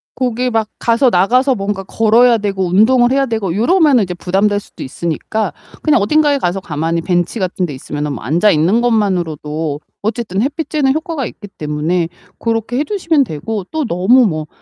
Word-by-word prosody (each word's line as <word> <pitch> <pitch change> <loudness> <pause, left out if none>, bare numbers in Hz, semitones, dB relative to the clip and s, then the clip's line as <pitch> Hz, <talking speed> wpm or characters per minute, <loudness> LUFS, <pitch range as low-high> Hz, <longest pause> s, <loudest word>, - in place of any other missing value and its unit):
거기 250 0 -1
막 225 -2 0
가서 235 +3 +3
나가서 250 +7 +3
뭔가 195 -1 -3
걸어야 225 +4 +3
되고 195 -2 -2
운동을 240 +7 +4
해야 275 +1 +2
되고 220 -8 -2
요러면은 285 - +4
이제 180 - -4
부담될 195 +3 0
수도 - - -11
있으니까 170 +9 -3 0.3
그냥 305 -8 +3
어딘가에 290 +6 +3
가서 180 -6 -1
가만히 165 0 -2
벤치 175 +5 -1
같은데 180 -4 -2
있으면은 145 +2 -4
뭐 115 - -7
앉아 170 - +3
있는 175 +10 +2
것만으로도 165 -9 -1 0.2
어쨌든 210 -2 -2
햇빛 290 +6 -2
쬐는 280 -4 +1
효과가 315 -3 -3
있기 205 - -9
때문에 155 +3 -1 0.3
고렇게 230 +1 -2
해 - - +2
주시면 335 -6 +1
되고 205 - -4
또 315 -3 -1
너무 225 +7 +3
뭐 155 -6 -2
210 Hz, 390 characters per minute, -16 LUFS, 175-250 Hz, 0.3 s, 운동을